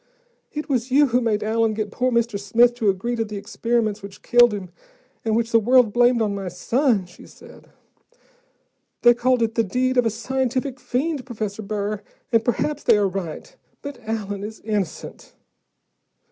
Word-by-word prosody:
"It 300 0 -5
was 255 -3 -1
you 280 +2 +4
who 245 +2 +2
made 220 -3 0
Allen 220 0 +1
get 210 -1 -3
poor 255 +3 0
Mr. 235 -3 0
Smith 230 +4 +3
to 230 -4 0
agree 195 +6 -1
to 230 - 0
the 210 -1 -7
experiments 215 +1 -1
which 200 0 -11
killed 240 -1 +5
him, 195 -3 -5 0.5
and 220 -1 0
which 230 0 0
the 230 - +5
world 240 -1 +4
blamed 240 0 +4
on 205 -2 -1
my 195 -1 -5
son," 225 - 0
she 175 - -16
said. - - -16 1.3
"They 240 - +8
called 245 0 +1
it 225 0 -1
the 230 - +2
deed 255 +5 0
of 245 -2 +4
a - - +2
scientific 260 +3 -2
fiend, 255 +4 -2
Professor 220 -4 -5
Burr, 205 0 -3 0.3
and 230 -2 +3
perhaps 295 +4 -1
they - - +4
are 205 -1 +2
right. 190 - -6 0.3
But 285 -1 -7
Allen 205 -3 -4
is 215 +1 -7
innocent." 205 -6 -4
230 Hz, 175 wpm, -22 LUFS, 205-250 Hz, 1.3 s, They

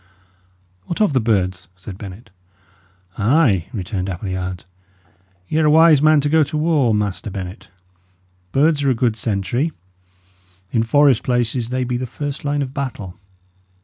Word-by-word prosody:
"What 170 - -4
of 210 -8 +2
the 130 - +3
birds?" 95 -5 0
said 95 +1 -10
Bennet. 105 +3 -10 0.9
"Ay!" 110 - +3
returned 95 -2 -4
Appleyard, 95 -1 -4 0.8
"y' 155 - -2
are 155 - +3
a - - +5
wise 160 -1 +6
man 155 0 +5
to 145 - 0
go 160 +1 +4
to 150 - -4
war, 150 -6 +2
Master 105 0 -2
Bennet. 95 +1 -7 0.8
Birds 145 - +2
are 140 - +2
a 130 - +2
good 115 -2 +1
sentry; 115 - -1 1.0
in 115 - +2
forest 135 +1 +4
places 120 -2 -1
they 130 0 -1
be 125 0 -2
the 130 +1 -4
first 145 +3 -5
line 145 0 0
of 130 -1 -7
battle. 125 -10 -5
120 Hz, 150 wpm, -20 LUFS, 100-145 Hz, 1.0 s, wise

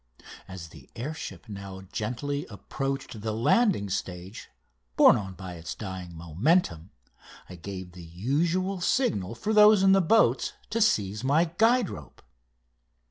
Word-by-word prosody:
As 90 -3 -9
the - - -16
air 140 +7 -4
ship 160 - -8
now 100 -2 -8
gently 140 +6 -3
approached 135 +2 -5
the 110 +1 -2
landing 155 - +2
stage, 90 +1 -6 0.5
borne - - +7
on 95 -3 -5
by 95 -1 -8
its 80 0 -7
dying 95 -4 -7
momentum, 85 - 0 0.6
I - - -11
gave 95 +1 -8
the 90 0 -12
usual 165 - -1
signal 115 - 0
for 210 - -2
those 210 -2 +7
in 195 - +6
the 195 0 +5
boats 220 +6 +3 0.2
to 230 - 0
seize 105 - +1
my 160 +5 +2
guide 230 -1 +4
rope. 75 -4 -11
110 Hz, 140 wpm, -27 LUFS, -, 0.6 s, borne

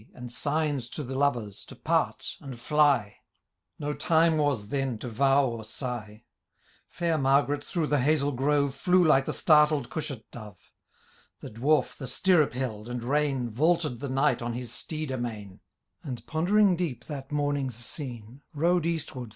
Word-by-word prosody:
And 125 -1 -8
signs 145 -2 -1
to 150 - -3
the 135 0 -6
lovers 120 -7 -1
to - - -12
part - - -1
and 130 -4 -8
fly; 140 -6 +2 0.6
No 145 0 -3
time 160 0 +3
was 130 -9 0
then 135 -3 -1
to 125 - -7
vow 135 +4 +3
or 115 -3 -4
sigh. 110 -2 -6 0.7
Fair 165 -2 -1
Margaret, 140 +2 +2
through 170 -3 -2
the 145 -1 +1
hazel 145 +1 +2
grove. 140 +1 +1
Flew 180 +6 +3
like 135 -4 +4
the - - -2
startled 150 -4 +3
cushat 140 -7 -4
dove 105 -5 -10 0.4
:* - - -33
The - - -8
Dwarf 140 +8 +1
the 135 - -6
stirrup 160 -8 +2
held 120 -4 -4
and 120 -1 -4
rein 135 -2 0
Vaulted 155 0 +1
the 140 - -5
Knight 135 -1 +1
on 120 0 -3
his 120 0 -4
steed 155 -3 -4
amain, 110 -6 -5 0.4
1 130 -4 -5
See - - -16
Appendix, 145 - 0 0.7
Note 165 0 +1
2 125 -2 -6
D. - - -13
140 Hz, 155 wpm, -27 LUFS, 120-150 Hz, 0.7 s, like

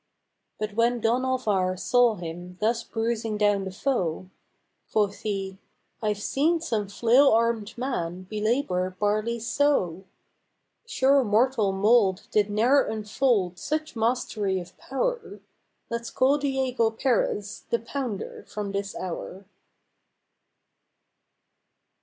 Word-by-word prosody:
But 215 -1 -4
when 235 +2 +2
Don 235 +3 +1
Alvar 210 -8 0
saw 245 +3 +3
him 175 +1 -8
thus 230 +2 +1
bruising 225 -1 -2
down 205 -2 +2
the 190 - -5
foe, 185 - -2 0.6
Quoth 205 -2 +1
he, 195 -2 -4 0.4
"I've 210 -2 0
seen 300 +10 +1
some 225 -11 -2
flail 240 +7 +4
armed 230 -1 +1
man 185 -9 -3
belabor 210 -4 -1
bar 210 +1 +2
ley 235 +2 -3
so: 225 - 0 0.8
Sure 275 - +3
mortal 220 -1 +2
mould 200 -1 +3
did 210 -1 +2
ne'er 240 +7 +4
enfold 210 -4 0
such 310 - -3
mastery 225 -4 0
of 180 0 -10
power; 475 - -3 0.5
Let 235 0 -3
's - - -5
call 275 +3 +2
Diego 265 -4 +1
Perez 225 -3 -1
'The 235 - +2
Pounder' 235 -4 -5
from 205 -1 -4
this 200 0 -3
hour." 185 +2 -6
220 Hz, 115 wpm, -26 LUFS, 195-250 Hz, 0.8 s, flail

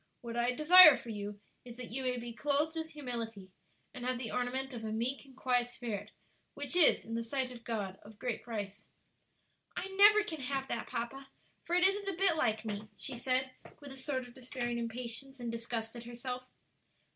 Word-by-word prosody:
What 235 -2 -6
I 240 +1 +2
desire 310 0 +10
for 235 - -8
you 205 -1 -5 0.2
is 240 -1 -10
that 250 -3 -7
you 265 +3 -2
may 250 -1 0
'be 240 0 -6
clothed 295 +5 0
with 320 0 -3
humility,' 230 -9 -5 0.4
and 250 - -7
have 255 0 0
'the 235 -3 -4
ornament 260 +2 -1
of 230 -2 -6
a 220 - -3
meek 240 +6 -2
and 265 -1 -18
quiet 245 -2 +2
spirit, 220 -4 -5 0.5
which 285 +4 -2
is, 355 -4 +6
in 230 - -6
the 230 - 0
sight 255 +2 -1
of 240 -2 -10
God, 205 -5 -3
of 210 0 -14
great 240 0 -3
price.'" 205 -3 -6 0.9
"I 385 - -3
never 415 +2 +7
can 320 -8 -5
have 270 +1 -2
that, - - -2
papa, 255 +3 -4 0.4
for 345 - 0
it 360 - +4
isn't 400 +1 -1
a 370 - -4
bit 385 -3 +4
like 220 -6 0
me," 210 0 -4
she - - -4
said, 255 +2 0 0.3
with 285 -2 -10
a - - -8
sort 260 -2 -3
of 245 - -15
despairing 245 -2 -3
impatience 240 +3 -6
and 240 -1 -3
disgust 230 0 -4
at 235 0 -8
herself. 250 +1 -5
245 Hz, 205 wpm, -33 LUFS, 230-275 Hz, 0.9 s, desire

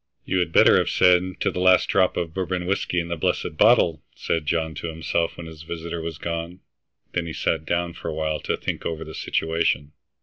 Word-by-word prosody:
"You 95 - 0
had 85 -2 0
better - - +6
have - - 0
said 90 -1 +5 0.2
'to - - +1
the - - -4
last 90 0 +5
drop 95 -2 +2
of 85 -2 -2
Bourbon 90 -1 -2
whiskey 90 -1 0
in 85 0 -4
the 85 - -1
blessed 80 0 -1
bottle!'" 105 -4 +4
said 80 -3 -2
John 80 0 0
to 85 - -5
himself 80 +1 -2
when 85 - -7
his 80 -1 -10
visitor 85 0 -5
was 80 -1 -5
gone. 85 +2 -5 0.5
Then 85 -1 -1
he 80 - -5
sat 80 0 -1
down 85 +1 -1
for - - -8
a - - -2
while 80 -1 -1
to - - -2
think - - -4
over 80 -1 -3
the 80 0 -9
situation. 80 -4 -1
85 Hz, 215 wpm, -24 LUFS, 80-90 Hz, 0.5 s, better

